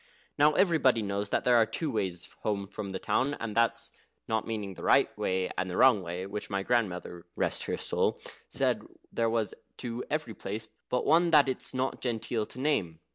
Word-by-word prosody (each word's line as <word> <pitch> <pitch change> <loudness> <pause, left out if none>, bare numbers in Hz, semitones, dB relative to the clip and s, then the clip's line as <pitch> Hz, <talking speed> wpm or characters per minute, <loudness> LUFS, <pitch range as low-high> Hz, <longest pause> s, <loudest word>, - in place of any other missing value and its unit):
Now 150 +1 +5
everybody 145 - +3
knows 100 0 -2
there 125 -1 +3
are 115 - +6
two 145 +7 -2
ways 95 -5 -2
home 100 -2 -1
from 100 0 -6
the 95 - -3
town; 140 +3 0
and 110 -2 -5
that's 115 0 +1 0.4
not 110 -1 -1
meaning 105 -4 -3
the - - -11
right - - +4
way 95 0 -1
and 95 0 -1
the 90 - -3
wrong 130 -6 +6
way, 90 +1 -4
which 105 +2 -5
my 100 -1 -1
grandmother 90 -7 -1
(rest - - -1
her - - -2
soul!) - - 0 0.3
said - - +1 0.3
there 115 -1 +1
was 115 -2 0 0.2
to 120 0 -4
every 150 -6 -2
place 110 +2 -5 0.2
but 125 - 0
one 170 +3 +5
that 150 -4 +6
it's 130 - -2
not 130 +1 -1
genteel 115 -2 -2
to - - -9
name. 95 - 0
110 Hz, 190 wpm, -29 LUFS, 100-130 Hz, 0.4 s, are